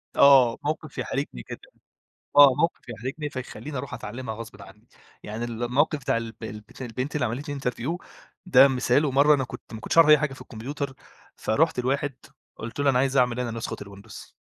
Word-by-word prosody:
آه، 130 -4 +6
موقف 155 -1 -3
يحرجني 135 - -3
جدًا، - - -9 0.7
آه، 140 -2 +9
موقف 160 -4 -1
يحرجني 130 +7 -5
فيخلّيني 140 +2 -7
اروح 125 0 -6
اتعلمها 110 +1 -6
غصبٍ 115 -2 -10
عنّي، 100 +4 -15 0.4
يعني 110 +3 -5
ال 120 0 -4
الموقف 145 +5 +1
بتاع 130 - 0
الب 115 -1 -6
البت 105 +2 -9
البنت 130 +4 -4
اللي 145 -4 +1
عملت 130 +7 -4
لي 145 -1 -4
interview 130 +5 -2 0.5
ده 180 -6 +7
مثال 130 +2 +2
ومرّة 140 +2 +5
أنا 135 - -1
كنت 125 - -10
ما 110 - -6
كنتش 110 - -3
اعرف 165 -2 +8
أي 150 - +9
حاجة 150 -1 -2
في - - -12
الكمبيوتر 135 +4 -6 0.4
فرُحت 160 +6 +1
لواحد 140 +2 -1 0.4
قُلت 115 +5 -8
له: 140 -1 +3
"أنا 125 -2 +3
عايز 135 +1 +1
اعمل 125 -1 +2
أنا 125 -2 -2
نسخة 115 0 -4
الWindows" 100 +2 -12
130 Hz, 185 wpm, -25 LUFS, 115-145 Hz, 0.7 s, آه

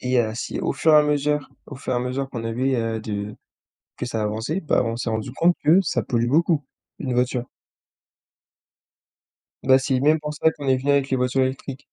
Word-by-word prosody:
et 125 0 +1
heu, 110 -1 -1
si 115 - -4
au - - 0
fur 155 +3 +2
et - - +8
à 150 - +7
mesure 150 0 0 0.2
au 140 - -9
fur 130 -1 -3
à - - +1
mesure 130 +2 -3
qu'on 115 -2 -5
avait, 130 +4 0
heu, 115 -1 -2
de 105 -1 -5 0.6
que - - -4
ça 115 -3 -2
avançait, 115 - -2
bah 150 - +1
on 115 0 -2
s'est 120 -1 -3
rendu 110 +2 -3
compte 170 +5 +3
que 170 +6 +6
ça 165 - -1
pollue 120 -2 0
beaucoup, 160 +1 +2 0.4
une 130 -4 -2
voiture 125 0 0 2.2
Bah 130 0 +6
c'est 135 0 -1
le 130 - +2
même 155 +3 +4
constat 150 +1 0
qu'on 145 -3 -8
est 130 -1 +4
venu 135 +3 -1
avec 140 -1 +2
les 130 - +1
voitures 125 +1 +1
électriques. 135 +1 -4
130 Hz, 210 wpm, -23 LUFS, 120-145 Hz, 2.2 s, et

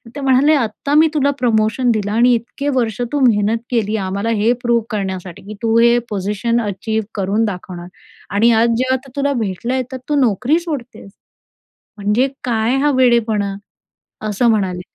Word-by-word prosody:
ते - - -5
म्हणाले, 270 +3 +4
"आता 275 +3 -2
मी 320 +1 +6
तुला 285 -1 +2
प्रमोशन 235 +1 +1
दिलं 205 -2 -1
आणि 240 +3 +4
इतके 260 +5 -4
वर्ष 230 -2 -1
तू 290 - 0
मेहनत 210 0 +2
केली 220 -2 0
आम्हाला 200 +4 -2
हे 230 +3 +3
प्रूव्ह 235 -2 +1
करण्यासाठी, 190 -3 -5
की 215 - -6
तू 225 0 +2
हे 235 +1 +5
पोझिशन 210 +4 -1
अचीव्ह 220 +1 -3
करून 205 +3 0
दाखवणार 180 -3 -6 0.5
आणि 230 +3 +4
आज 235 - +3
जेव्हा 260 +1 +1
आता 265 +1 -16
तुला 280 0 0
भेटलंय 205 +6 -3
आहे, 260 - 0
तर 260 - -4
तू 295 - +1
नोकरी 250 - +2
सोडतेस, 270 - -7 0.9
म्हणजे 210 +7 +1 0.2
काय 235 +1 0
हा 295 +1 +2
वेडेपणा" 225 -5 +2 0.7
असं 220 +3 +1
म्हणाले. 190 -5 0
230 Hz, 165 wpm, -18 LUFS, 205-255 Hz, 0.9 s, मी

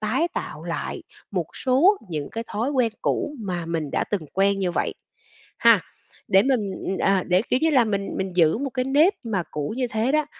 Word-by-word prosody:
tái 255 +11 +1
tạo - - -5
lại - - -4 0.3
một - - -1
số 280 +11 +4
những 150 -4 -4
cái 230 0 -4
thói 235 +7 -1
quen 250 -5 +1
cũ 295 - -1
mà 180 -5 -3
mình 160 -4 -2
đã - - 0
từng 185 -7 -3
quen 195 +1 +2
như 185 -2 -1
vậy, - - -1 0.6
ha. - - +6 0.5
Để 195 +1 +5
mình, 260 -2 +2 0.3
ừ, 190 - -1
ờ, 195 -2 +2
để, 180 +3 +2
kiểu 250 - +3
như 320 - +4
là, 255 -5 +5
mình 200 -2 -2
mình 190 -2 -3
giữ 165 +3 +4
một 275 0 -3
cái 255 0 -1
nếp 295 +9 +4
mà 205 -6 -1
cũ 150 +7 -3
như 255 - 0
thế 225 +4 0
đó, 305 -1 +2
215 Hz, 215 wpm, -24 LUFS, 185-265 Hz, 0.6 s, ha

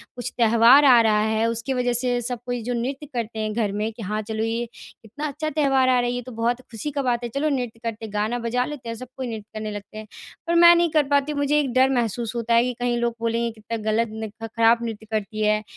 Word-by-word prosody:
कुछ 245 0 -5
त्योहार 235 +5 +6
आ 250 -3 +8
रहा 215 -1 +3
है। 220 +1 +1
उसकी 230 +4 -2
वज़ह 245 -1 0
से 245 0 0
सब 245 0 -4
कोई 245 -1 -3
जो 245 +1 -2
नृत्य 265 +5 -3
करते 225 -2 -4
हैं 215 0 -2
घर 215 -3 0
में 210 +2 -2
कि 230 - -11
हाँ 210 +3 -2
चलो 220 +1 -3
ये 230 +1 -1
कितना 290 +8 -8
अच्छा 310 +2 -3
त्योहार 270 -3 +2
आ 250 -1 +4
रहा 245 - 0
है 240 - 0
ये 245 0 -3
तो 255 +1 -10
बहुत 235 +2 -1
ख़ुशी 230 +7 -5
का 280 0 -2
बात 245 -2 0
है, 240 - -3
चलो 280 +6 -1
नृत्य 245 -5 -3
करते 225 -1 -4
हैं 210 - -10
गाना 215 +4 -1
बजा 245 +2 -1
लेते 265 -6 -7
हैं 230 - -4
सबको 255 +2 -8
नृत्य 220 -4 -5
करने 215 -1 -4
लगते 205 +1 -8
हैं। 215 0 -8 0.4
पर 340 - +1
मैं 345 0 +8
नहीं 340 -1 +2
कर 305 -2 +3
पाती 285 +1 +2
हूँ 290 - -4
मुझे 290 +1 +2
एक 270 -4 -1
डर 260 +1 +4
महसूस 235 -2 -1
होता 235 0 -1
है 235 - +5
कि 250 0 -1
कहीं 245 -1 0
लोग 235 -1 -1
बोलेंगे 230 0 0
कितना 225 +1 -6
ग़लत 230 +1 +1
नृत्य 220 +1 -7
ख़राब 230 +1 +3
नृत्य 220 -1 -5
करती 215 0 -3
है, 215 0 +2
235 Hz, 265 wpm, -23 LUFS, 220-255 Hz, 0.4 s, आ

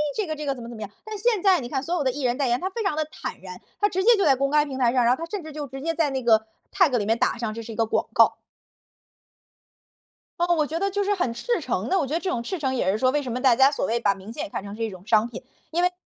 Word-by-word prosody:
这 430 - -1
个 310 -3 -3
这 300 -1 -6
个 275 - 0
怎 245 - -9
么 - - -8
怎 240 - -8
么 220 - -9
样， 210 - -5 0.2
但 435 0 -6
是 405 - -7
现 455 -6 +2
在 380 -3 +5
你 240 -3 -6
看 265 0 -2
所 335 - -3
有 345 -4 0
的 260 - +2
艺 280 +2 -5
人 245 -1 +1
代 275 - +2
言， 240 +1 +1
他 370 - -2
非 460 - -4
常 385 -7 0
地 310 - +1
坦 - - -6
然， 180 -1 -10 0.2
他 415 - +4
直 375 -2 -1
接 465 +2 +6
就 395 - +2
在 275 - +5
公 275 +1 0
开 300 +1 +3
平 270 -2 -6
台 240 -2 +3
上， 245 -1 +2
然 245 +2 +4
后 - - -18
他 - - -4
甚 400 -2 -4
至 310 - -8
就 295 -1 -5
直 270 +1 -8
接 330 +1 0
在 320 -2 +1
那 265 -1 -3
个， 220 -2 +4 0.3
tag 310 -10 +4
里 210 - -1
面 225 +2 +1
打 - - +1
上 230 -2 -3
这 230 - -6
是 230 0 -8
一 - - -7
个 225 - +1
广 220 - -1
告。 - - +5 2.0
呃， 345 - +3
我 305 -2 +2
觉 320 - -3
得 395 +3 0
就 405 +1 0
是 405 +1 +1
很 350 -11 -1
赤 475 - -1
诚 - - -2
地， 385 - +3
我 300 - +1
觉 275 - -5
得 330 - +1
这 375 - -3
种 235 -10 -2
赤 360 +9 -4
诚 265 -3 -1
也 190 -6 +1
是 205 - 0
说 255 +3 +3
为 295 +2 +1
什 255 - -5
么 250 +2 -3
大 255 -3 +5
家 270 +3 +5
所 280 - -1
谓 235 +1 0
把 205 -4 +2
明 195 +2 -11
星 290 +6 -5
也 320 - -6
看 - - -5
成 200 0 -8
是 225 - -4
一 225 - -1
种 185 -2 -12
商 220 -1 +4
品。 240 +2 -9 0.3
因 340 +2 +1
为 360 0 +3
270 Hz, 380 characters per minute, -24 LUFS, 235-335 Hz, 2.0 s, 接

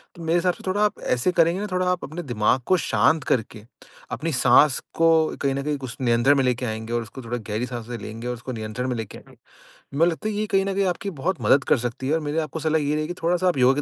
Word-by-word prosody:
तो 170 - -9
मेरे 165 +1 +2
हिसाब 180 +1 +2
से - - -15
थोड़ा 195 +2 0
आप 210 - -2 0.2
ऐसे 125 +9 +1
करेंगे 170 +1 +2
ना 210 - -3
थोड़ा 185 0 0
आप 180 - -2
अपने 165 +5 -6
दिमाग 120 -1 +1
को 185 - +3
शांत 160 -3 +2
करके, 110 -4 -1 0.5
अपनी 165 +2 -2
साँस 125 +3 +5
को 165 -1 +3
कहीं 135 -1 +1
न 140 - -2
कहीं 150 0 -1
कुछ 130 -3 -8
नियंत्रण 120 +3 +4
में 135 - +3
लेके 125 0 0
आएँगे 110 0 -4
और 120 - +1
उसको 115 +4 -9
थोड़ा 120 +1 -3
गहरी 110 +1 -3
साँसे 120 -1 -6
लेंगे 115 +2 -7
और 125 - -1
उसको 125 +2 -7
नियंत्रण 110 +2 -4
में 125 - -1
लेके 110 -3 -6
आएँगे। - - -17 0.6
मैं 165 - +6
लगता 175 +5 -2
है - - -3
ये 210 +1 -1
कहीं 195 0 +3
न 195 - -1
कहीं 195 0 +1
आपकी 185 +2 -2
बहुत 175 -4 -1
मदद 135 +6 +4
कर - - +6
सकती 125 +2 -4
है। 145 - +1
और - - +1
मेरी 150 0 -3
आपको 160 - -6
सलाह 155 0 +1
ये 145 +1 0
रहेगी 155 0 -1
कि 175 +2 -7
थोड़ा 175 +2 +2
सा 185 +1 0
आप 175 - +1
योगा 130 +3 +4
140 Hz, 275 wpm, -24 LUFS, 120-170 Hz, 0.6 s, मैं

